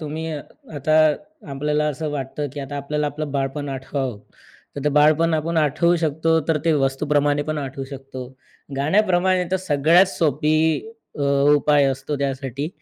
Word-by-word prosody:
तुम्ही, 155 +1 -5 0.5
आता 155 +2 +1 0.5
आपल्याला 150 +2 0
असं 150 +1 -3
वाटतं 145 +1 -4
की 145 - -6
आता 140 +1 -6
आपल्याला 150 +1 -2
आपलं 145 0 -4
बालपण 140 +1 -2
आठवावं. 130 -3 -4 0.6
तर 140 - -5
ते - - +3
बालपण 155 +2 +4
आपण 165 +2 -1
आठवू 155 +3 +3
शकतो, 160 0 +1
तर 160 - +2
ते 165 - +3
वस्तूप्रमाणे 145 +1 +1
पण 155 0 -3
आठवू 135 -1 -5
शकतो, 135 -2 -8 0.5
गाण्याप्रमाणे 185 +3 +2
तर 190 - +2
सगळ्यात 170 +1 +4
सोपी 155 -3 +1 0.6
अ, - - -4 0.3
उपाय 145 -1 +3
असतो, 135 +2 -2
त्यासाठी. 135 +1 -3
150 Hz, 145 wpm, -22 LUFS, 140-155 Hz, 0.6 s, बालपण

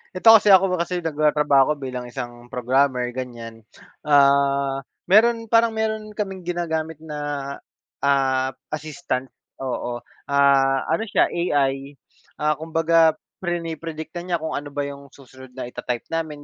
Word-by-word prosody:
eto 205 +5 +5
kasi 210 -1 +5
ako 190 -1 +5
kasi 175 +1 -2
nagtratrabaho 150 -3 +2
ako - - 0
bilang 130 -2 -5
isang 120 -1 -8
programmer, 125 0 +1
ganiyan. 115 -3 -7 0.4
Ah, 140 -1 +3 0.2
meron 230 +4 +4
parang 230 0 +4
meron 220 -1 -2
kaming 195 -3 -5
ginagamit 160 -3 -3
na, 155 -2 -7 0.8
ah, 135 -1 +2 0.2
assistant, 150 -3 -4 0.3
oo, 120 -2 -4 0.2
ah, 140 -1 +3
ano 165 +7 +1
siya - - +2
AI, 140 -4 -1 0.5
ah, 150 -1 +1
kumbaga 165 0 +3 0.2
prine-predict 165 -3 -4
na - - -6
niya 175 -1 +1
kung 160 - -3
ano 145 - -4
ba 145 0 -3
'yung 140 0 -7
susunod 130 -1 -15
na 130 - -5
ita-type 125 -1 -4
namin, 160 -3 -3
145 Hz, 135 wpm, -22 LUFS, 135-170 Hz, 0.8 s, eto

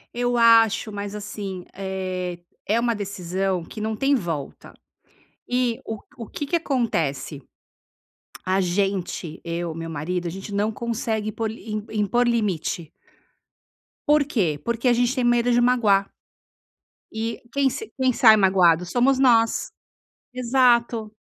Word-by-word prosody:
Eu 245 0 0
acho, 225 -2 +5
mas 205 0 -5
assim, 200 -3 -6
eh, 185 -2 -4 0.3
é 220 +3 +2
uma 235 -1 +1
decisão 190 -2 -2
que 210 +6 -9
não 220 0 -2
tem 275 +5 +1
volta. 165 - -3 0.8
E 245 -2 0
o 220 -1 -5 0.2
o 230 - -7
que 290 - -5
que 340 +4 +1
acontece? 165 - -2 1.0
A 190 +1 +1
gente, 185 -3 -2
eu, 170 -1 -3
meu 165 0 -5
marido, 170 +3 -3
a 170 - -3
gente 195 +3 -8
não 210 +2 0
consegue 220 -1 -2
por 220 0 -3
im 215 -2 -6
impor 220 +3 +1
limite 190 -8 -1 1.2
por 295 -1 +4
que? 180 - 0
Porque 235 +2 +1
a 240 - +5
gente 245 +2 +1
tem 255 - 0
medo 240 0 +3
de 240 - +3
magoar. 220 -6 +3 1.0
E 225 +1 -3
quem 280 -1 +3
se 290 - -7
quem 260 -1 +2
sai 225 -2 +7
magoado 180 -4 +4
somos 255 +7 +2
nós. 230 -4 +3 0.6
Exato. 240 -3 +2
215 Hz, 140 wpm, -23 LUFS, 185-240 Hz, 1.2 s, sai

